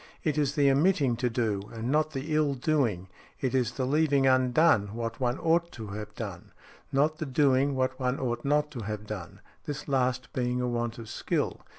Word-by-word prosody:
It 155 - +1
is 145 -2 0
the 140 -2 +4
omitting 140 -3 +3
to 125 +1 0
do, 110 -4 -1
and 115 +2 -3
not 155 +1 +2
the 150 +1 -4
ill 150 -2 +2
doing—it 125 - -2
is 125 -2 +1
the 130 - -2
leaving 140 0 +2
undone 130 -4 +3
what 115 -1 -4
one 125 0 0
ought 170 +1 +1
to 110 -3 -7
have 105 +1 -7
done—not 135 - -3
the 155 - -3
doing 135 0 +3
what 130 0 -1
one 125 0 0
ought 120 -2 -2
not 150 +1 +1
to 130 - -6
have 105 -1 -5
done—this 110 - -8
last 130 -2 0
being 125 0 0
a 125 - 0
want 120 -1 -2
of 115 -1 -8
skill. - - -2
130 Hz, 185 wpm, -28 LUFS, 115-145 Hz, -, the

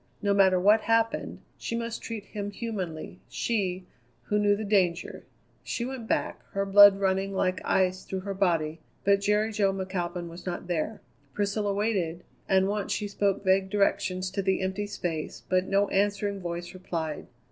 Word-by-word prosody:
No 200 -1 +1
matter 190 -2 +5
what 210 +4 +5
happened, 225 0 0 0.2
she 230 - -3
must 230 0 -3
treat 225 -3 -5
him 205 -1 -5
humanly, 185 - -5
she, 185 - -1 0.4
who 210 +10 0
knew 205 0 +4
the 215 - -4
danger. 185 -4 0 0.4
She 235 - -3
went 255 -3 -6
back, - - -1
her 195 0 0
blood 200 0 +8
running 195 0 0
like 185 -1 0
ice 185 0 +1
through 190 -1 -4
her 200 +1 -4
body; 165 -5 0 0.2
but 200 0 +4
Jerry 210 +2 +2
Jo 205 -2 +2
McAlpin 185 -2 -3
was 170 +1 -10
not 180 -1 -4
there. 175 +5 -2 0.3
Priscilla 205 0 0
waited, 185 -5 -1 0.3
and 190 0 +4
once 205 0 -2
she 210 - -1
spoke 200 -1 0
vague 190 0 +3
directions 185 -2 0
to 195 - -1
the 190 0 +1
empty 190 +2 -2
space, 165 -6 -4
but 185 0 +2
no 200 +1 +2
answering 205 0 0
voice 175 0 -5
replied. 165 -4 -4
195 Hz, 170 wpm, -28 LUFS, 185-205 Hz, 0.4 s, blood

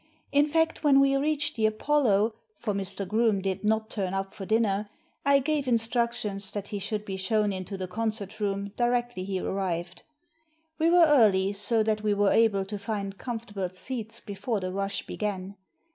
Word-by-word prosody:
In 285 +1 +4
fact, 325 +1 +1
when 280 -2 +6
we 275 0 +4
reached 295 +1 0
the 220 -1 +3
Apollo 220 -2 +2
— 435 - -45
for 210 - -3
Mr. 195 0 -1
Groome 215 0 +2
did 190 0 -3
not 220 +1 +1
turn 195 -3 -2
up 195 0 -3
for 195 -3 -7
dinner 210 -2 +1 0.2
— - - -42
I - - +8
gave 285 0 0
instructions 230 -4 0
that 205 -1 -4
he 205 - -3
should 210 +1 -3
be 195 -2 -4
shown 205 +1 +1
into 190 +1 -5
the 185 -1 -4
concert 215 +1 -3
room 200 -1 -2
directly 240 -4 0
he 190 0 -2
arrived. 180 -2 -3 0.8
We 325 +1 +4
were 345 0 +7
early, 205 -10 +4
so 215 +3 +1
that 215 -1 0
we 210 -1 +1
were 205 0 +3
able 210 -4 +3
to 205 +1 -5
find 200 -2 -4
comfort 235 -3 -5
able 190 -2 -1
seats 225 +2 -5
before 205 +2 -3
the 185 -1 -4
rush 195 +1 -3
began. 200 -2 -4
210 Hz, 190 wpm, -27 LUFS, 195-235 Hz, 0.8 s, I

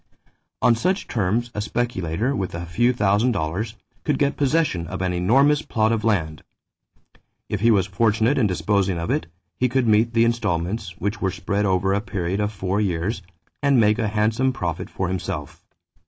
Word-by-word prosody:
On 120 - +6
such 185 - -1
terms 115 +3 -1
a 105 - -3
speculator 110 - -1
with 95 -6 -3
a 85 +1 -5
few 120 +9 +2
thousand 110 +1 +2
dollars 100 +5 -3 0.3
could 150 -3 0
get 140 -1 +1
possession 140 - +1
of 95 - -5
an 90 -1 -1
enormous 135 +12 +3
plot 110 -5 0
of 115 -1 0
land. 85 -8 0 1.1
If 105 - -2
he 115 +4 +3
was 100 -5 +4
fortunate 115 +6 +1
in 115 - +3
disposing 95 -1 0
of 85 0 -2
it, 80 - -1 0.3
he 125 - +2
could 130 -1 +1
meet 110 +2 +3
the 115 0 +5
installments, 100 -5 -1
which 100 +3 -3
were 95 - +1
spread 100 +3 -2
over 95 +1 +1
a 100 - +1
period 95 -3 -3
of 105 0 0
four 95 0 -1
years, 95 +2 -1 0.4
and 140 -3 +4
make 105 +1 +3
a 110 - +1
handsome 110 +5 +1
profit 85 - -4
for 95 - -3
himself. 85 -5 -5
105 Hz, 180 wpm, -23 LUFS, 95-115 Hz, 1.1 s, On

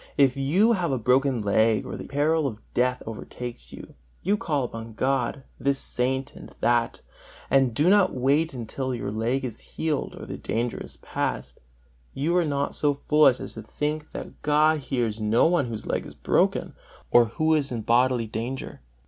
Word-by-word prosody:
if 135 -2 +4
you 165 +12 +3
have 170 - 0
broken 130 +3 +3
a 115 - -2
leg, 110 +2 +3
or - - -5
the - - -6
peril 150 +2 +1
of 110 -5 -5 0.2
death 125 +1 +1
overtakes 120 +2 -7
you, - - -11 0.3
you 200 +4 +2
call 150 -9 -1
upon 115 -2 -6
God, 135 +2 0 0.2
this 140 0 +1
Saint 130 +2 -1
and - - -12
that, 120 -1 +1 0.5
and 135 -4 +3
do 150 +7 +2
not 195 -1 +5
wait 140 +6 +2
until 130 +1 -4
your 115 - -4
leg 120 +5 -1
is 115 -3 -6
healed, 155 -3 -3
or - - -7
the - - -6
danger 120 +2 -2
is - - -12
past: - - -4 0.6
you 160 +6 0
are 175 -2 +3
not 140 -1 -1
so 145 -1 +1
foolish 150 -2 +4
as - - -7
to 110 - -7
think 150 +7 -3
that - - -8
God 150 +1 +3
hears 120 -6 -2
no 110 +2 +3
one 170 -4 +3
whose 110 -2 -6
leg - - -1
is - - -12
broken, - - +1 0.4
or 120 -1 +7
who 155 +8 +1
is 145 -4 +1
in 120 -2 -3
bodily 120 +1 +2
danger. 115 - -5
130 Hz, 180 wpm, -25 LUFS, 120-150 Hz, 0.6 s, or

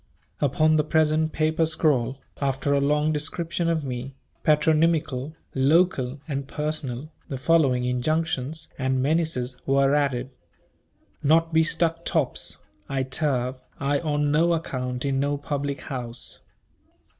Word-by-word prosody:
Upon 155 +3 +3
the 150 - +3
present 155 0 +2
"papper 160 +1 +1
scrawl," 140 -5 +1 0.2
after 140 +1 0
a 140 - +3
long 150 +2 +2
description 165 +3 -2
of 160 -2 0
me, 130 0 -5 0.3
patronymical, 155 -2 +2 0.2
local, 140 -1 +2
and 140 -3 -3
personal, 150 -2 -3 0.2
the 135 - -3
following 135 -3 +3
injunctions 155 +3 -1
and 130 0 +1
menaces 140 -5 0
were 135 0 +3
added, 135 -3 0 0.9
"Not 165 +3 +3
be 160 0 +5
stuck 165 0 +1
tops 155 -7 -1 0.3
I 135 -1 0
turve 130 -2 -1 0.2
I 140 0 +1
on 150 -2 0
no 165 +3 +3
account 125 -5 -3
in 135 -1 +1
no 145 +1 0
public 140 -1 -3
house. 120 -4 -6
145 Hz, 125 wpm, -25 LUFS, 130-160 Hz, 0.9 s, be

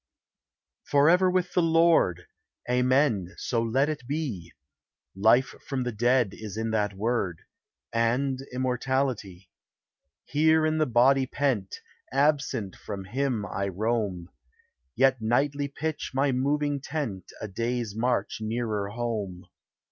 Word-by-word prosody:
Forever 165 +6 +4
with 180 -1 0
the 180 - +3
Lord! 165 - +3 0.4
Amen! 125 -6 +2
so 115 -2 -1
let 130 +5 +1
it 150 -6 -4
be! 135 - -3 0.6
Life 110 +7 +4
from 130 -2 -1
the 125 - -2
dead 120 +1 +2
is 110 -2 -8
in 110 0 -2
that 105 -2 0
word, 100 -5 -1 0.5
And 125 +4 +1
immortality. 125 -7 -2 0.7
Here 155 +1 +3
in 155 0 +1
the 155 - +2
body 130 +2 +4
pent, 125 -9 -1 0.3
Absent 140 -7 +1
from 100 -1 -7
him 125 0 -1
I 100 -1 -3
roam, 100 -3 -2 0.7
Yet 130 -1 +3
nightly 140 +5 +1
pitch 155 +1 -4
my 135 +1 +2
moving 145 +2 0
tent 135 - -4
A 110 - -5
day's 115 +1 -3
march 120 +1 0
nearer 110 -2 -2
home. 105 -5 -4
125 Hz, 120 wpm, -27 LUFS, 105-140 Hz, 0.7 s, Forever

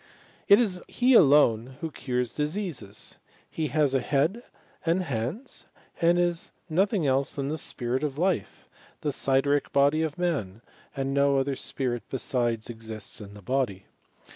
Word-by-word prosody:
It 200 - +8
is 190 -7 0
he 255 +1 +3
alone 130 - +5
who 165 -1 -4
cures 125 -3 -2
diseases. 150 - -3 0.3
He 160 -1 -2
has 150 -3 +2
a 135 - +3
head 150 - +1 0.4
and 170 +3 +2
hamdSf 140 - -4 0.4
and 170 +1 +4
is 175 -1 0 0.2
nothing 190 +1 +1
else 135 0 +1
than 140 -1 -2
the 155 - -1
spirit 130 -1 -2
of 145 -2 -2
life, 175 - -1 0.3
the 150 - -1
mderic 140 +1 +1
body 140 +3 +3
of 155 -2 -2
man, 120 - -2 0.3
and 135 0 -2
no 140 0 +3
other 135 0 0
spirit 125 -2 -2
besides 120 -4 -1
exists 110 -2 -7
in 100 0 -10
the 105 - -12
body. 120 -6 -1
140 Hz, 150 wpm, -27 LUFS, 125-165 Hz, 0.4 s, It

